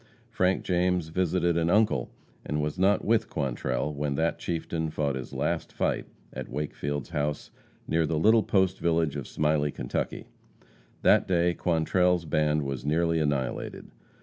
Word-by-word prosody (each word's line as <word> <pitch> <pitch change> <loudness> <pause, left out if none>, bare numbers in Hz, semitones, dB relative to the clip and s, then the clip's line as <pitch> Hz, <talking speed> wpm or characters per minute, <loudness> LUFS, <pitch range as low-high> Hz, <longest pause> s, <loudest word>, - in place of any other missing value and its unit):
Frank 95 +1 +1
James 90 -2 +1
visited 85 0 +1
an 85 0 +1
uncle, 105 - +2 0.3
and 75 - -2
was 75 +4 -2
not 100 +2 +3
with 115 0 +2
Quantrell 65 -1 -2
when 70 -1 -2
that 80 +2 0
chieftain 80 -1 -2
fought 75 -2 -1
his 65 -1 -6
last - - -2
fight - - -1 0.3
at - - -6
Wakefield's 75 -1 -3
house, 75 -2 -2 0.4
near 80 0 +1
the 80 - 0
little 110 +7 +5
post 95 -2 +1
village 80 -3 +1
of 70 -4 -5
Smiley, 75 -1 +1
Kentucky. - - -3 0.8
That - - +5
day 85 -1 +2
Quantrell's 90 +1 +1
band 75 -1 +1
was 70 -2 -4
nearly 80 +2 +1
annihilated. 70 -4 -2
80 Hz, 150 wpm, -27 LUFS, 75-90 Hz, 0.8 s, little